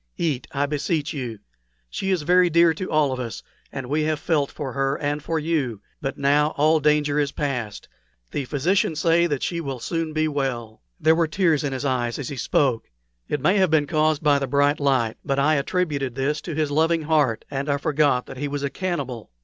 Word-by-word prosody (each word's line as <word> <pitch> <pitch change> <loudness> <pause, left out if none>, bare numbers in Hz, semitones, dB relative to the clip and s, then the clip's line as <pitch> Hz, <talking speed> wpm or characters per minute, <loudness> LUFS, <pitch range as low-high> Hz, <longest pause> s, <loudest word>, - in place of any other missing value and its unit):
"Eat, 140 -7 -1
I 140 0 0
beseech 150 +2 -1
you. 125 -6 -5 0.5
She 190 - -4
is 185 -5 +1
very 180 +2 +4
dear 170 0 +5
to 185 +4 -5
all 150 -3 +2
of 130 - -3
us, 120 -3 -5 0.3
and 135 - -5
we 150 +4 0
have 155 -1 0
all - - -18
felt 150 -5 +1
for 140 -4 -5
her 135 0 0
and 145 0 -2
for 165 +2 -2
you. 150 -9 -1 0.2
But 135 - -3
now 145 +2 +2
all 155 +2 +4
danger 150 0 +2
is 145 -1 0
past. 125 -8 -4 0.4
The 140 - -2
physicians 155 +4 0
say 170 +1 +3
that 145 -4 -2
she 170 -1 -2
will 135 -4 -4
soon 165 +4 -2
be 155 0 +1
well." 125 - -3 0.2
There 160 - +4
were 165 0 +2
tears 160 -3 +1
in 145 - -1
his 135 +2 -4
eyes 125 -3 0
as 145 - -5
he 140 - -5
spoke. 125 -1 0 0.4
It 150 - -1
may 185 +8 +3
have 190 -2 +3
been 155 -2 +3
caused 155 0 +1
by 145 -2 +4
the 135 - -2
bright 145 +1 +2
light, 130 -6 +1
but 135 -1 -1
I 145 +3 +3
attributed 140 -4 -1
this 145 +3 -1
to 165 - -6
his 155 -1 0
loving 160 +2 +2
heart, 150 -7 +1
and 140 +1 -3
I 140 - +2
forgot 145 -3 +1
that - - -10
he 145 +2 -2
was 145 0 -4
a 140 - -1
cannibal. 140 - -4
145 Hz, 220 wpm, -23 LUFS, 135-155 Hz, 0.5 s, dear